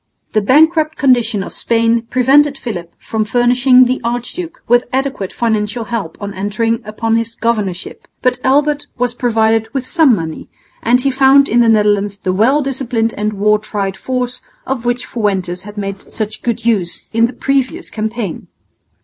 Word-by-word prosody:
The 215 - +3
bankrupt 310 +7 +3
condition 240 -7 +2
of - - -9
Spain 230 0 +1
prevented 275 +3 +3
Philip 175 -10 -6
from 220 -1 -2
furnishing 250 +3 +4
the 255 +1 -1
archduke 245 +9 -4
with 240 +1 +3
adequate 265 -7 -2
financial 225 0 -1
help 220 -7 -4
on 205 -1 -5
entering 215 +4 -1
upon 225 +2 -1
his 230 0 -3
governorship, 210 -6 -3 0.2
but 250 -1 +1
Albert 290 +2 +2
was 245 -1 0
provided 225 -2 +1
with 265 -2 -1
some 310 -5 +4
money, 160 -4 -6 0.3
and 245 +2 +3
he 270 +2 +1
found 270 +1 +5
in 240 - +2
the 235 -1 +4
Netherlands 205 -2 +2
the 185 -2 -2
well 255 +10 +3
disciplined 245 -4 -1
and 210 +1 -2
war 210 +1 +2
tried 200 -2 -3
force 250 +1 -3 0.2
of 260 -3 -3
which 245 0 -1
Fuentes 190 -5 -2
had 210 - -12
made 195 -1 -4
such 215 -1 -4
good 235 -2 -3
use 200 -7 0
in 230 +1 +3
the - - -7
previous 270 +1 -1
campaign. 220 -4 -4
230 Hz, 165 wpm, -16 LUFS, 210-255 Hz, 0.3 s, found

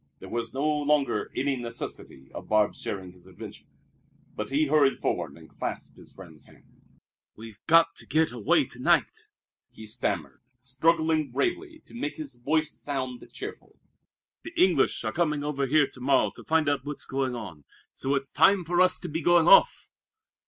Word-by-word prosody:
There - - -11
was 115 -1 -3
no 140 +3 -1
longer 150 -6 +1
any 135 +1 0
necessity 115 - -8
of - - -9
Barbe's 110 -1 +2
sharing 95 -2 -5
his 90 -1 -20
adventure. - - -11 0.7
But 105 - -4
he 145 +3 +2
hurried 145 -2 +3
forward - - -2
and - - -15
clasped - - -6
his - - -13
friend's 80 -6 -14
hand. - - -23 0.5
"We've 110 -1 -12
got 165 +1 +5
to - - -9
get 160 -2 +2
away 120 -4 +2
to - - -13
night," - - +1 0.4
he 110 - -12
stammered, 85 - -3 0.2
struggling 160 +3 +1
bravely 355 -3 -3
to - - -15
make 235 -11 -4
his 145 -4 -7
voice 155 +5 0
sound 130 -3 -4
cheerful. - - -9 0.6
"The 330 +1 -8
English 370 - +3
are - - -3
coming 150 -4 0
over 140 -2 -1
here 150 +2 +4
to 125 - -13
morrow 135 +2 +2
to - - -13
find 160 -1 +2
out 145 -2 0
what's 145 0 -5
going 135 -2 -2
on 90 -11 -9 0.3
so 135 +1 -1
it's 135 0 -3
time 195 -2 +4
for 175 +2 +2
us 185 0 +4
to 180 - -5
be 160 +1 -3
going 175 +1 +4
off! 195 - +5
140 Hz, 175 wpm, -27 LUFS, 120-160 Hz, 0.7 s, got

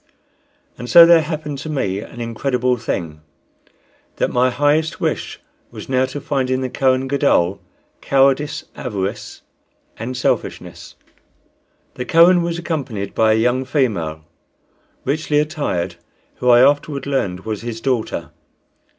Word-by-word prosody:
And 120 +2 -7
so 170 -1 +9
there 170 -1 +6
happened 150 -2 -5
to 155 - -7
me 100 -10 -1
an 115 - -10
incredible 125 +2 -1
thing, 85 -9 -4 0.9
that - - -1
my 125 +1 +2
highest 145 +4 +1
wish - - -3 0.3
was - - -10
now 130 0 +2
to 140 +2 -6
find 135 -3 -2
in 130 0 0
the 130 -1 -3
Kohen 130 0 +1
Gadol 130 -10 +1 0.4
cowardice, 140 +2 +2
avarice, 100 -1 -5 0.6
and 125 +3 -5
selfishness. - - -3 1.0
The 125 - -5
Kohen 175 +4 +5
was 170 0 -2
accompanied 135 - -4
by 110 -1 +3
a - - +2
young 125 +3 +1
female, 95 - -1 0.8
richly 150 +2 0
attired, 145 - -2 0.4
who, 125 - 0
I 120 0 +7
afterward 140 0 +2
learned, 100 -10 -2
was 110 0 -5
his 115 -1 -5
daughter. 125 -2 -2
130 Hz, 135 wpm, -19 LUFS, 110-145 Hz, 1.0 s, so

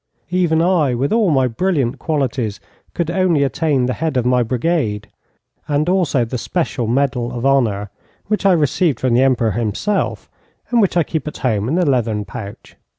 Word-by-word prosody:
Even 170 -3 +2
I, 165 -8 +2
with 135 - 0
all 220 -4 +3
my 135 -4 +3
brilliant 135 -1 -1
qualities, 130 -8 -2 0.4
could 170 -1 -1
only 175 -5 +2
attain 140 -1 +1
the 125 - -1
head 160 -2 -2
of 125 - 0
my 125 0 +3
brigade, 120 -3 -1 0.6
and 145 +2 0
also 170 -9 +1
the 125 +2 -4
special 140 -6 -2
medal 125 -1 0
of 125 +1 -4
honour, 110 -7 +1 0.3
which 215 +1 -1
I 195 -2 +5
received 155 -2 +1
from 130 -2 +1
the 120 - +4
Emperor 125 -4 +2
himself, 115 - -2 0.4
and 240 -2 +4
which 190 -3 +1
I 170 - +4
keep 155 -1 -4
at 150 - -5
home 110 -4 -1
in 160 - 0
a 180 - +2
leathern 115 -7 0
pouch. 100 0 -9
135 Hz, 180 wpm, -18 LUFS, 120-165 Hz, 0.6 s, I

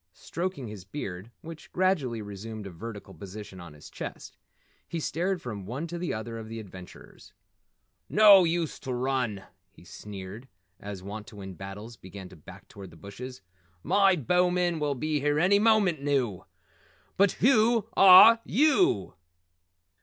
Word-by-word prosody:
Stroking 170 - -5
his 105 -3 -9
beard 95 -3 -7
which 160 -1 -11
gradually 150 - 0
resumed 105 +1 -8
a 100 - -7
vertical 105 +5 -9
position 100 -1 -10
on 85 -3 -11
his 75 - -13
chest, - - -8 0.5
he 170 - -4
stared 175 +4 -2
from 105 -6 -7
one 130 +8 -4
to 170 +1 -6
the 175 - -3
other 115 +1 -5
of 110 -1 -9
the 115 0 -6
adventurers. 95 -4 -13 0.8
"No 205 -3 +7
use 170 -1 -1
to 130 -2 -5
run," 125 -6 -2 0.3
he - - -20
sneered 100 +4 -9 0.3
as 100 -2 -8
Wantowin 100 -1 -8
Battles 100 +5 -9
began 95 0 -11
to 90 - -14
back 75 - -14
toward 100 -2 -11
the 80 - -16
bushes. 110 +6 -10 0.4
"My 195 +3 +4
bowmen 180 +2 +1
will 145 -2 -1
be 155 +3 -1
here 145 +1 0
any 195 +5 +4
moment 205 -8 +3
now! 130 -10 -1 0.7
But 200 0 +3
WHEW 230 -2 +3
are 195 +5 +9
YEW?" 310 +6 +2
125 Hz, 145 wpm, -27 LUFS, -, 0.8 s, are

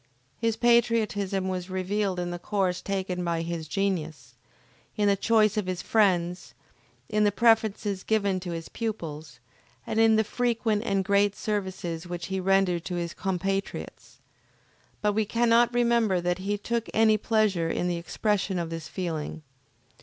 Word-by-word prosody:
His 230 -1 +1
patriotism 225 -5 +2
was 185 -1 -3
revealed 190 0 -1
in 175 0 -2
the 175 - -5
course 185 -2 -1
taken 190 -2 -2
by 170 -1 -1
his 165 -1 -4
genius, 160 - -2 0.6
in 205 -1 +2
the 200 - +4
choice 215 +1 +3
of 205 -3 -1
his 185 -1 -3
friends, 180 -5 +1 0.5
in 210 0 +1
the 205 - +4
preferences 220 -3 +2
given 200 -3 +1
to 180 0 -7
his 165 -1 -5
pupils, 160 - -5 0.5
and 225 - -1
in 225 -1 +5
the 220 - +3
frequent 230 -2 0
and 195 -3 0
great 200 0 +3
services 185 -5 -3
which 175 0 -5
he 190 - 0
rendered 185 -2 +2
to 180 - -3
his 170 -1 -3
compatriots; 195 +1 -3 0.9
but 210 0 +2
we 220 +1 +2
cannot 235 +2 +3
remember 235 -5 +2
that 175 +1 -1
he 205 +2 -1
took 230 +2 -2
any 220 0 +5
pleasure 210 -6 +1
in 175 - -1
the 175 -1 -1
expression 195 +2 -1
of 170 -1 -3
this 165 -1 -5
feeling. 165 -4 -4
195 Hz, 155 wpm, -27 LUFS, 175-215 Hz, 0.9 s, in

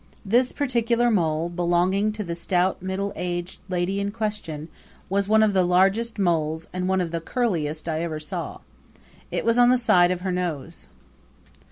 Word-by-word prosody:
This 245 +5 +3
particular 240 -3 +1
mole 165 -5 +1
belonging 175 +4 +1
to 215 0 -4
the 170 -3 -4
stout 180 +2 0
middle 190 +2 -3
aged 175 0 -4
lady 180 +2 -1
in 200 0 -1
question 205 -8 -4 0.4
was 200 +1 +1
one 220 +1 +5
of 210 -2 +2
the 190 -1 +3
largest 195 +6 +2
moles 160 -4 0
and 185 0 -2
one 190 0 +2
of 170 -2 -3
the 165 -1 -3
curliest 165 -8 -2
I 160 -1 -1
ever 160 -2 -3
saw. 155 - -5 0.7
It - - -2
was 230 +1 +3
on 245 0 +7
the 255 - +5
side 180 -7 +4
of 180 -1 -2
her 185 0 -2
nose. 175 -7 -4
185 Hz, 175 wpm, -24 LUFS, 170-210 Hz, 0.7 s, on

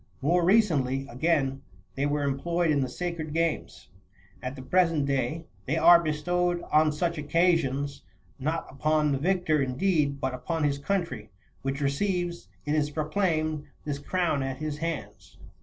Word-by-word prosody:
More 170 +4 +3
recently, 150 - +3
again, 135 0 0 0.3
they 140 +6 0
were 145 0 0
employed 165 +5 0
in 145 -2 +2
the 130 - -1
sacred 165 +1 -4
games;28 165 -1 -1 0.5
and - - -10
at 130 +2 -3
the 130 -1 -10
present 165 -3 +3
day 140 +4 -1 0.2
they 155 +5 +1
are 170 +1 +8
be 155 -2 0
stowed 175 +3 0
on 155 0 +5
such 170 +2 -1
occasions, 145 -3 +1 0.4
not 155 +4 -1
upon 150 +2 +1
the 135 - 0
victor, 175 -2 +1
indeed, 140 +1 +1
but 130 -1 -1
upon 160 +5 -2
his 140 -1 +1
country, 175 +3 -2 0.3
which 135 +1 -3
receives, 175 +4 -1 0.2
it 150 - 0
is 150 -1 +1
proclaimed, 155 -1 -1 0.2
this 145 -2 -3
crown 170 -1 0
at 135 -1 -3
his 150 0 -4
hands. 165 -3 -5
155 Hz, 155 wpm, -27 LUFS, 140-170 Hz, 0.5 s, are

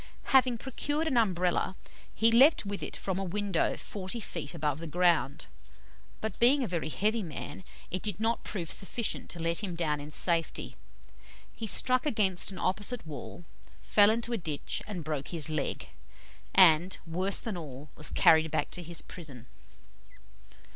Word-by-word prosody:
Having 255 -2 +5
procured 290 +6 -2
an 280 - 0
Umbrella, 185 -4 +1 0.4
he 225 +1 +4
leaped 260 +2 +5
with 200 0 -4
it - - -5
from 190 -1 -3
a - - -2
window 195 -1 -1
forty 200 +3 -5
feet 165 -6 -5
above 150 -2 -1
the 165 - -6
ground, 170 -4 +1 0.8
but 220 - -4
being 265 +4 +5
a - - -2
very 170 -4 -2
heavy 215 +7 0
man, 170 +1 -7 0.3
it 185 - -2
did 210 -2 -3
not 225 +1 0
prove 175 -6 -4
sufficient 220 +3 -1
to 170 - -5
let 165 0 0
him 190 -5 -4
down 155 -3 -1
in 145 +1 -8
safety. 165 +1 0 0.8
He 225 - -5
struck 255 +6 +4
against 195 -10 +2
an 190 - -8
opposite 205 +3 0
wall, 155 +3 -8 0.4
fell 205 -1 +6
into 235 +2 -1
a - - 0
ditch 155 -6 -3
and 190 -6 -5
broke 150 -2 -4
his 160 -3 +2
leg, 155 -2 -3 0.7
and, 180 -1 +6
worse 185 +4 -1
than 225 -5 -5
all, 145 -4 -9
was 150 - -5
carried 160 0 +4
back 155 - -2
to 180 - -5
his 170 0 -3
prison. 140 -9 -9
185 Hz, 165 wpm, -29 LUFS, 160-220 Hz, 0.8 s, fell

